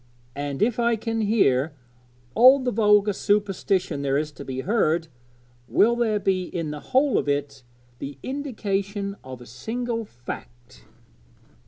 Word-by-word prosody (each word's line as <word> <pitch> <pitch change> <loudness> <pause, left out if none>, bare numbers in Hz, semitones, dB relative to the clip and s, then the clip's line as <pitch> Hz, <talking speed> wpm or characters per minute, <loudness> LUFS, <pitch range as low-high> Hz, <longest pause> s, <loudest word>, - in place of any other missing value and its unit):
And 145 +3 -2
if 240 +1 +1
I 235 0 +3
can 225 0 -2
hear 160 - +2 0.6
all 255 +4 +8
the 255 -2 -1
vulgar 210 -1 +4
superstition 195 -5 0
there 140 0 +1
is 150 +1 -2
to 145 - -10
be 130 0 -4
heard, 165 - +1 0.6
will 235 +3 +4
there 230 -3 +1
be 190 -2 0
in 165 -3 -4
the 150 - -6
whole 265 - +2
of - - -2
it 140 -1 -2 0.4
the 140 -1 -6
indication 200 -7 -3
of 130 -1 -9
a - - -11
single 230 - -4
fact?' 120 - -10
200 Hz, 145 wpm, -24 LUFS, 145-225 Hz, 0.6 s, all